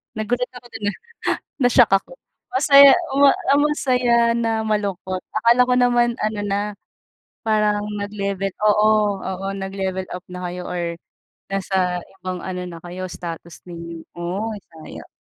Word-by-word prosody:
Nagulat 245 +3 -1
ako 245 - -11
do'n 225 -2 -6
ah. - - -12 0.7
Na-shock 245 -1 +5
ako. 195 - +2 0.4
Masaya, 275 +1 +8 0.2
ma 280 0 +7 0.3
masaya 255 -5 +2 0.2
na 230 -1 0
malungkot. 200 -4 -2
Akala 235 +3 +4
ko 250 - +2
naman 240 -1 +3
ano 215 -1 -1
na, 200 0 0 0.8
parang 210 -2 +1 0.2
nag-level 200 -1 -3
oo, 210 -1 +3
oo, 190 0 -4
nag-level 190 -1 -3
up 180 - -6
na 180 0 -7
kayo 180 0 -6
or 170 -1 -2 0.6
nasa 185 -2 0 0.2
ibang 185 0 -4
ano 180 0 -5
na 170 - -8
kayo, 180 +2 -7
status 170 -1 -8
ninyo. 170 -1 -8 0.2
Oh, 180 +6 -3 0.2
sayang. 160 -1 -11
205 Hz, 135 wpm, -21 LUFS, 185-235 Hz, 0.8 s, Masaya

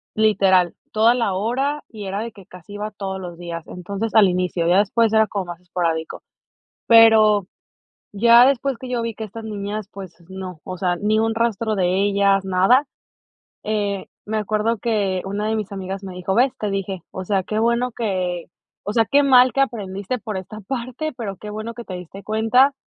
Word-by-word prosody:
literal, 195 -5 +3 0.2
toda 220 +2 +4
la 230 -6 0
hora 265 +9 -1
y 215 -3 -9
era 195 +2 -3
de 230 +1 -5
que 195 -3 -16
casi 180 +3 -13
iba 210 +1 -4
todos 195 -2 -5
los 175 -2 -8
días, 170 -1 -7
entonces 200 +5 -5
al 215 -3 +7
inicio, 180 -2 -1
ya 180 +3 +5
después 220 +2 +2
era 220 0 +4
como 200 -3 -3
más 175 -1 -8
esporádico. 170 -3 -3 0.6
Pero, 220 -4 +6 0.6
ya 235 +4 +6
después 270 -1 +1
que 255 +2 -8
yo 245 -2 -1
vi 230 0 -3
que 220 - -6
estas 220 +1 -8
niñas, 210 -1 -4
pues 190 -3 -9
no, 190 -3 -8
o 185 - -6
sea, 175 0 0
ni 210 +3 +1
un 225 0 +1
rastro 225 -1 0
de 185 0 +1
ellas, 200 -1 +2
nada. 190 +9 +3 0.8
Eh, 205 -2 -2 0.2
me 215 +1 -1
acuerdo 215 +2 0
que 200 -5 0
una 200 +2 -3
de 220 - 0
mis 210 -2 -4
amigas 195 0 -5
me 190 - -7
dijo: 180 +1 -2
"¿Ves? 260 +4 +2
Te 210 - -2
dije", 195 -2 -3
o 185 - -6
sea, 195 0 0
qué 215 +4 -3
bueno 235 +2 +1
que, 185 -6 -2 0.4
o 205 - -3
sea, 225 0 +3
qué 285 +4 +4
mal 255 -2 +6
que 275 - +1
aprendiste 205 -2 -3
por 215 -2 -5
esta 200 +3 -7
parte, 255 +7 -4
pero, 200 -5 -5
qué 210 - -10
bueno 215 +2 -5
que 235 - -8
te 185 - -7
diste 180 +2 -9
cuenta, 225 +6 +3
210 Hz, 195 wpm, -21 LUFS, 190-225 Hz, 0.8 s, al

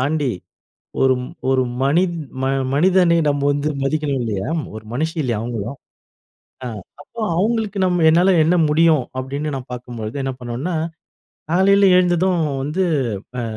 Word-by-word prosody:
தாண்டி, 145 -1 0 0.7
ஒரு 130 0 +5 0.4
ஒரு 130 -1 +3 0.2
மனித் 170 +5 +2 0.2
ம - - 0 0.3
மனிதனை 180 +1 +4
நம்ப 145 0 -1
வந்து 145 +1 -1
மதிக்கணும் 145 -1 -1
இல்லையா? 105 +3 -3 0.3
ஒரு 110 - -8
மனுஷி 160 +5 -2
இல்லையா 120 -4 -1
அவங்களும்? 115 +2 -4 0.9
அ - - -4 0.4
அப்ப - - -30 0.2
அவுங்களுக்கு 215 0 0
நம்ம 175 -2 +1
என்னால 180 +4 +4
என்ன 170 +3 +3
முடியும் 155 -3 +3
அப்படின்னு 140 +3 -3
நான் 130 -1 -9
பாக்கும்பொழுது, 120 -2 -6
என்ன 135 - -2
பண்ணோம்னா, 125 +9 -3 0.8
காலையில 195 +2 +5
எழுந்ததும் 180 0 +2 0.2
வந்து 150 +7 -1 0.6
அ - - -2
150 Hz, 135 wpm, -20 LUFS, 130-180 Hz, 0.9 s, ஒரு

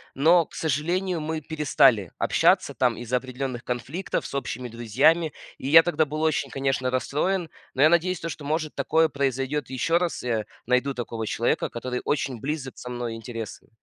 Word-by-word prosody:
Но, 165 +4 +5
к - - -24
сожалению, 170 +4 -1
мы 160 +1 -2
перестали 140 - +3
общаться - - +3
там 125 -3 +1
из-за 120 +1 -1
определённых 130 -1 -5
конфликтов 130 +9 -3
с - - -6
общими 125 -2 -3
друзьями. 135 +8 +2 0.3
И 130 - -6
я 165 +3 +10
тогда 160 -3 +1
был 155 +2 -4
очень, 155 -3 +1
конечно, 135 -2 -1
расстроен, 165 +7 0 0.2
но 130 - -1
я 155 - +7
надеюсь, 170 +1 +2
то, 165 - -4
что, 155 -2 -6
может, 155 +1 -2
такое 160 +4 +3
произойдёт 135 0 -1
ещё 135 +6 +1
раз, 175 -6 -2
я 115 -3 0 0.2
найду 125 +3 +2
такого 115 -2 -4
человека, 115 +2 0
который 125 +1 -4
очень 135 -5 -1
близок 140 -2 -4
со 125 - -8
мной 120 -2 -4
интересы. 115 -1 -7
140 Hz, 175 wpm, -25 LUFS, 125-160 Hz, 0.3 s, я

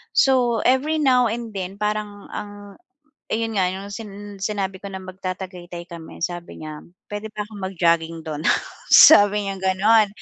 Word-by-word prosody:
so 245 -4 +3
every 280 +5 +2
now 255 -3 +4
and 230 0 -4
then 190 -1 -5
parang 210 -1 -3
ang 205 - -6 0.8
ayun 225 0 -1
nga, 185 - +3
'yong 195 +2 -6
sin 210 -1 -7 0.3
sinabi 195 -2 -2
ko 200 - -6
na 190 -1 -6
magta-Tagaytay 185 -2 -7
kami, 170 -2 -10
sabi 175 -2 -6
niya, 155 -1 -7 0.3
puwede 205 +1 -4
ba 210 0 -3
akong 210 -2 -11
mag-jogging 170 -3 0
do'n, 150 -2 -4 0.5
sabi 205 -7 +8
niyang 195 -1 -4
gano'n, 205 +3 +4
200 Hz, 155 wpm, -22 LUFS, 185-220 Hz, 0.8 s, sabi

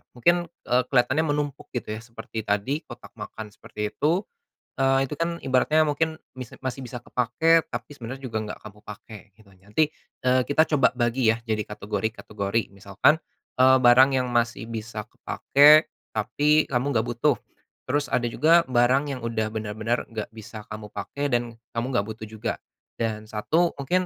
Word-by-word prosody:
mungkin, 175 +8 +2 0.2
eee, 125 +1 +2
kelihatannya 130 +5 +2
menumpuk, 145 -1 -2
gitu 120 - -3
ya. 110 - -4
Seperti 115 -1 -8
tadi 105 +9 0
kotak 120 - -11
makan, 105 0 -7
seperti 105 0 -6
itu. 170 +7 +1 0.5
Eee, 135 0 +2
itu 150 - -5
kan 170 +1 -2
ibaratnya 135 +4 +3
mungkin 160 +2 -1 0.2
mis 125 -3 -8
masih 130 0 -4
bisa 125 0 -6
kepakai, 160 +8 +2
tapi - - -5
sebenarnya 130 +2 -7
juga 125 -4 -4
enggak 105 - -7
kamu 105 0 -11
pakai, 105 0 -10 0.2
gitu. 110 -3 -21
Nanti, 105 +11 0 0.4
eee, 130 0 +4
kita 155 +3 +3
coba 135 - +5
bagi 120 -1 +2
ya - - -5
jadi 110 -2 0
kategori-kategori. 105 0 -3
Misalkan, 100 +9 +2 0.4
eee, 130 0 +7
barang 125 +2 +7
yang 130 - +1
masih 120 -1 0
bisa 110 -1 -5
kepakai, 150 +3 +5 0.3
tapi 150 +8 +2
kamu 135 +2 0
enggak 110 -1 +1
butuh, 120 0 +2 0.5
terus 145 +2 +1
ada 120 -2 0
juga 165 +7 +5
barang 125 +2 +3
yang - - -11
udah 110 -2 -1
benar-benar 110 +2 -2
enggak 110 -2 -4
bisa 110 0 -10
kamu 105 -1 -8
pakai 145 0 -4
dan 120 -1 -1 0.2
kamu 115 +1 -1
enggak 100 - +1
butuh 110 0 -7
juga, 110 +1 -3 0.5
dan 110 -1 -2
1 155 +11 +1
mungkin 180 +7 +1
120 Hz, 165 wpm, -25 LUFS, 110-140 Hz, 0.5 s, eee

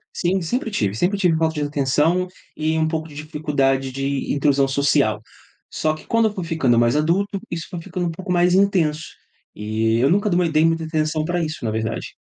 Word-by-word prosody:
Sim, 185 +2 0
sempre 235 +7 -2
tive. 105 - -1
Sempre 190 - +1
tive 180 -4 +2
falta 160 0 0
de 150 - -2
atenção 150 +6 +1 0.3
e 160 +1 0
um 160 0 +2
pouco 160 0 -3
de 145 - -14
dificuldade 145 -3 -1
de 135 +1 -2
inclusão 140 -1 +2
social, 140 -5 +2 0.5
só 155 0 0
que - - -14
quando 230 -1 +2
eu 210 - -4
fui 185 -4 -4
ficando 150 -8 +1
mais 120 +3 +3
adulto, 190 +6 +1
isso 165 -2 -4
foi 175 -3 -6
ficando 175 0 -4
um 170 - -2
pouco 180 +2 -6
mais 175 0 +3
intenso, 175 -6 +2 0.5
e 110 +2 0
eu 130 +4 +3
nunca 205 +2 +2
de 175 - +1
uma 175 -1 +2
dei 155 0 +3
muita 165 0 +1
atenção 155 -1 -1
pra 175 0 -1
isso, 155 -6 -5
na 110 - 0
verdade. 110 +1 -3
155 Hz, 210 wpm, -21 LUFS, 140-175 Hz, 0.5 s, mais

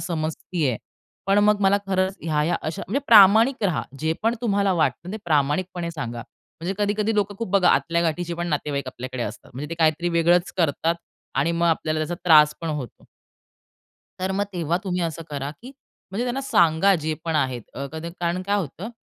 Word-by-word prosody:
समजते 160 -1 -2
आहे. 120 - 0 0.5
पण 195 +1 +4
मग 210 0 +3
मला 195 0 +4
खरंच 190 0 0
ह्या-ह्या 160 +1 0
अशा 155 0 -4
म्हणजे 250 +10 -1
प्रामाणिक 220 +3 +6
रहा. 180 -6 +1 0.2
जे 160 +1 +1
पण 225 +2 +2
तुम्हाला 200 -4 +1
वाटतं 175 +2 -1
ते - - -3
प्रामाणिकपणे 170 +3 0
सांगा. 120 -7 -5 0.4
म्हणजे 185 +4 -2
कधी-कधी 210 +1 0
लोकं 205 -1 0
खूप 230 - -3
बघा 190 -2 +4
आतल्या 170 0 +1
गाठीचेपण 170 +1 -2
नातेवाईक 145 -3 -2
आपल्याकडे 130 0 -5
असतात. 110 +1 -7
म्हणजे 145 +5 -6
ते - - -2
काहीतरी 160 +2 +2
वेगळंच 170 +1 +2
करतात 165 0 +1 0.4
आणि 145 +5 +1
मग 170 0 +1
आपल्याला 155 -1 0
त्याचा 155 +3 -2
त्रास 150 -3 +6
पण 165 - -4
होतो. 145 -7 -5 1.1
तर 185 +1 -2
मग 200 +1 0
तेव्हा 170 -1 -1
तुम्ही 180 -1 -1
असं 165 -1 -3
करा, 140 -1 -4
की 250 - -9 0.4
म्हणजे 210 +6 -2
त्यांना 250 +2 -2
सांगा 175 -6 +3
जे 155 -2 -2
पण 165 -1 0
आहेत 130 -5 -1
अ, 140 +2 -4
कद 160 +1 -6
कारण 175 +1 -1
काय 200 +2 0
होतं 185 +3 -4
170 Hz, 185 wpm, -23 LUFS, 155-195 Hz, 1.1 s, प्रामाणिक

